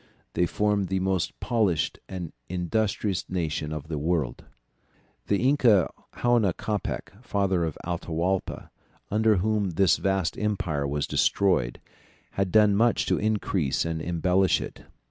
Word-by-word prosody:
They 90 - +2
formed 105 -1 0
the 95 0 0
most 95 -2 -1
polished 105 - 0
and 90 -4 -6 0.2
industrious 95 +2 -1
nation 80 -4 -2
of 75 -1 -5
the 80 -2 -3
New - - -4
World." 80 -5 -1 0.8
The 100 +5 +2
inca 120 - +4 0.2
Huayna 120 -7 +2
Capac, 105 -3 -3
father 95 -6 0
of 80 -3 -3
Atahualpa, 85 +2 -2 0.4
under 110 +1 +3
whom 105 +1 +1
this 95 +1 +4
vast 95 -4 0
empire 90 -9 -1
was 70 +1 -1
destroyed, 90 -12 +1 0.5
had 95 -2 -1
done 105 -2 +5
much 115 +3 +3
to - - +1
increase 100 -10 0
and 80 -1 -2
embellish 90 +3 +2
it. - - -8
95 Hz, 135 wpm, -26 LUFS, 85-105 Hz, 0.8 s, done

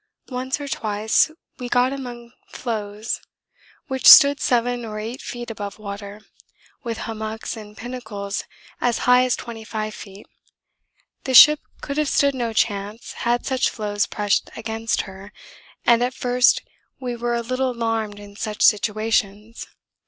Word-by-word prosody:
'Once 260 +2 -3
or 285 - -6
twice 215 0 +1 0.3
we 245 -1 -5
got 245 +2 +2
among 240 -3 -8 0.2
floes 215 -2 -4 0.6
which 265 -4 0
stood 280 0 +9
7 245 0 0
or 215 -2 -6
8 225 +4 -6
feet 240 -1 -6
above 205 -2 -6
water, 200 0 -8 0.6
with 230 -2 -4
hummocks 220 0 -5
and 210 -1 -11
pinnacles 225 -5 -5 0.4
as 245 -1 +1
high 250 0 +6
as 250 - +1
25 220 -2 -6
feet. 200 -1 -11 1.0
The 260 -1 0
ship 300 +4 +10 0.2
could 280 0 -5
have 305 -2 +1
stood 280 0 +3
no 240 -3 -2
chance 210 0 -2 0.2
had 240 0 +1
such 260 -2 +1
floes 205 -2 -2
pressed 205 -1 0
against 225 0 -2
her, 195 0 -11 0.5
and 235 0 +5
at 250 +1 -2
first 250 0 +3 0.4
we 245 -2 -4
were 240 0 -1
a 235 - -1
little 255 +2 -1
alarmed 225 -3 -2
in 205 0 -12
such 210 0 -3
situations. 215 0 +1
230 Hz, 145 wpm, -22 LUFS, 210-245 Hz, 1.0 s, ship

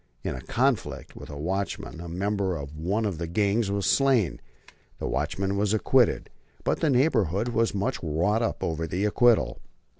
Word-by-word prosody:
In - - -2
a 65 - -6
conflict - - -1
with - - -10
a 70 - -7
watchman 95 +2 -3
a 85 - -7
member 95 +1 -1
of 70 0 -7
one 95 +8 -1
of 95 -6 -2
the 85 - -3
gangs 100 +4 +1
was 100 -1 -1
slain. 130 - +2 0.6
The - - -5
watchman 100 +1 -1
was 105 +1 +2
acquitted, 125 +2 +2 0.3
but - - 0
the 160 - +2
neighborhood 120 - +2
was 115 -2 +1
much 100 0 -1
wrought 85 +8 +1
up 115 - -2
over 80 0 -2
the 90 +6 -1
acquittal. 115 +1 +3
100 Hz, 175 wpm, -26 LUFS, 85-110 Hz, 0.6 s, acquittal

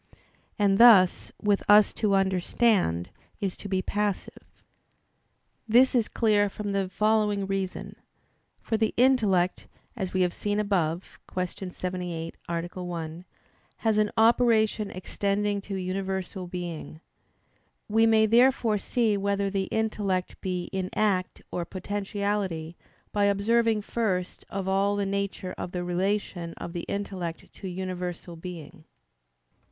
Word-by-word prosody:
And 200 -1 +3
thus 215 -7 +7
with 205 -1 +2
us 210 0 +7
to 205 -3 +1
understand 190 - +1 0.3
is 195 -3 -2
to 200 - -8
be 185 -1 0
passive. 205 -1 -4 1.0
This 245 +4 +5
is 235 -4 +2
clear 210 -3 +2
from 205 +1 -5
the 195 -2 -1
following 210 0 +1
reason. 195 -1 -3 0.7
For 225 - 0
the 220 0 0
intellect, 215 -8 +3 0.3
as 190 -6 -3
we 185 - 0
have 175 -1 0
seen 205 0 -1
above 180 -5 -1
(Q. 185 +1 -3
78, 180 -3 -4
A. 175 +2 -3
1), 170 -1 -5 0.5
has 220 -2 +1
an 210 0 +2
operation 220 -2 +3
extending 200 +2 -1
to 195 0 -6
universal 190 0 -3
being. 175 -3 -6 0.9
We 225 +2 +4
may 220 -1 +5
therefore 230 -1 +4
see 225 -2 +1
whether 200 0 0
the 195 -1 0
intellect 205 -4 -2
be 180 -2 -2
in 190 -1 -2
act 195 -4 0
or 175 - -2
potentiality 195 -3 -3 0.4
by 205 -1 +2
observing 215 +2 +2
first 190 -6 -2
of 195 -1 -4
all 195 +1 +2
the 200 0 0
nature 195 -1 -3
of 175 - -5
the 180 -1 -2
relation 180 -1 -2
of 170 - -7
the 175 - -4
intellect 185 -4 -5
to 195 - -8
universal 180 -1 -5
being. 165 -1 -9
195 Hz, 130 wpm, -27 LUFS, 180-210 Hz, 1.0 s, thus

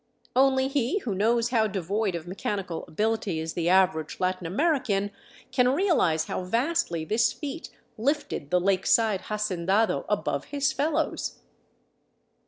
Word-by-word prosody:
Only 265 0 +4
he 275 +5 0
who 220 - -2
knows 230 +4 +2
how 225 -3 +2
devoid 200 0 -1
of 165 -1 -5
mechanical 185 -1 -4
ability 215 -2 -1
is 160 0 -4
the 170 0 0
average 185 -5 +2
Latin 185 -1 -1
American 210 - +1 0.4
can 250 -1 +3
realize 285 - +2
how - - -3
vastly 230 - 0
this 220 +7 +2
feat 300 +2 -6 0.3
lifted 275 - -1
the 180 - +3
lake 190 +1 +1
side 220 -4 +3
hacendado 210 0 0
above - - -1
his 280 -2 0
fellows. 290 +4 -1
210 Hz, 135 wpm, -26 LUFS, 185-260 Hz, 0.4 s, Only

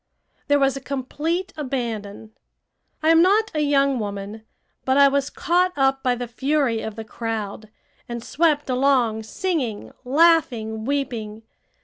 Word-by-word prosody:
There 285 -1 +4
was 275 -1 +2
a 275 - -6
complete 310 +8 -3
abandon. 230 -7 -4 0.7
I 315 - +3
am 330 0 +6
not 415 +5 +3
a 305 - -1
young 280 -3 +2
woman, 205 +1 -5 0.4
but 260 +1 +1
I 280 0 +7
was 280 +1 0
caught 360 +2 +1
up 270 0 +2
by 250 -1 +1
the 245 0 -5
fury 260 -1 0
of 220 -1 -6
the 225 -1 -7
crowd, 220 -2 -5 0.4
and 235 -1 -5
swept 300 -1 +1
along 250 -4 +2
singing, 250 - -3
laughing, 250 -7 +2
weeping. 230 -6 -3
270 Hz, 140 wpm, -22 LUFS, 225-295 Hz, 0.7 s, I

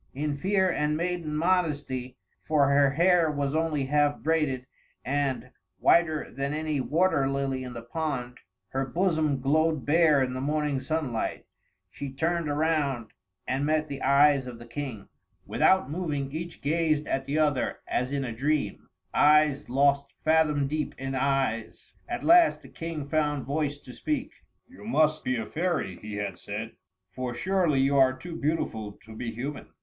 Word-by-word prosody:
In 145 +1 -1
fear 190 +5 +2
and 150 -3 0
maiden 170 -3 -2
modesty 150 -7 0 0.3
for 145 -3 +3
her 140 0 +5
hair 170 +3 +3
was 145 -1 -1
only 155 -3 0
half 145 +1 +2
braided, 150 -5 0 0.4
and, 140 -1 -1 0.3
whiter 160 -3 +3
than 140 +3 -2
any 155 -2 -1
water 150 -2 +2
lily 135 -1 -1
in 125 -1 -7
the 115 -1 -7
pond, 125 -2 -4 0.3
her 135 +1 -1
bosom 155 -1 0
glowed 155 +2 +1
bare 155 -2 +4
in 125 -1 -2
the 130 - -4
morning 150 -1 0
sunlight 130 -4 -2 0.5
she 140 +6 -6
turned 165 +3 -1
around, 145 -6 0 0.4
and 130 +2 0
met 155 +1 +1
the 140 - -6
eyes 140 -1 +4
of 120 -2 -7
the 120 - -11
King. 120 -4 -6 0.4
Without 190 -7 +3
moving, 150 -5 -2
each 170 +3 -6
gazed 155 0 +1
at 135 -1 -2
the 145 +2 -1
other 145 -5 +1
as 125 +2 -1
in 140 -1 -1
a 120 - -4
dream 145 +4 -1 0.2
eyes 150 -1 +4
lost 140 +2 +2
fathom 155 -3 +3
deep 150 +2 -3
in 135 0 -4
eyes. 135 -4 -1 0.2
At - - -3
last 340 0 +5
the - - -13
King 165 -3 -5
found 145 -2 0
voice 145 +1 -1
to 125 -3 -13
speak. 300 - -2 0.4
"You 260 - -15
must 155 -8 +2
be 130 - 0
a 115 -2 -2
fairy," 160 - -2
he 105 -1 -7
had 100 -3 -4
said, 110 +2 -5 0.4
"for 125 +5 -5
surely 175 -5 +1
you 135 +1 +2
are 130 -1 +5
too 170 +5 -8
beautiful 115 -10 -2
to 110 0 -11
be 115 +1 -4
human!" 130 +6 -5
145 Hz, 165 wpm, -27 LUFS, 130-155 Hz, 0.5 s, her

